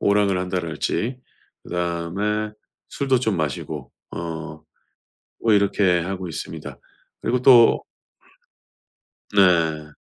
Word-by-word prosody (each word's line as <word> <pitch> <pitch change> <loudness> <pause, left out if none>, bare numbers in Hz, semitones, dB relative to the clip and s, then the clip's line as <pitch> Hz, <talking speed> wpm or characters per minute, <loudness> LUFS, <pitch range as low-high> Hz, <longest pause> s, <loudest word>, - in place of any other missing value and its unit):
오락을 100 -2 +2
한다랄지 90 - -2 0.4
그다음에 90 +5 -2 0.4
술도 135 -3 +1
좀 110 -6 0
마시고 75 -4 -4 0.3
어 80 -2 -6 0.8
뭐 110 - +4
이렇게 100 -3 +3
하고 95 0 -4
있습니다. - - -7 0.4
그리고 125 +1 0
또 120 -3 +7 1.5
네. 80 -6 +3
95 Hz, 195 characters per minute, -23 LUFS, 85-105 Hz, 1.5 s, 또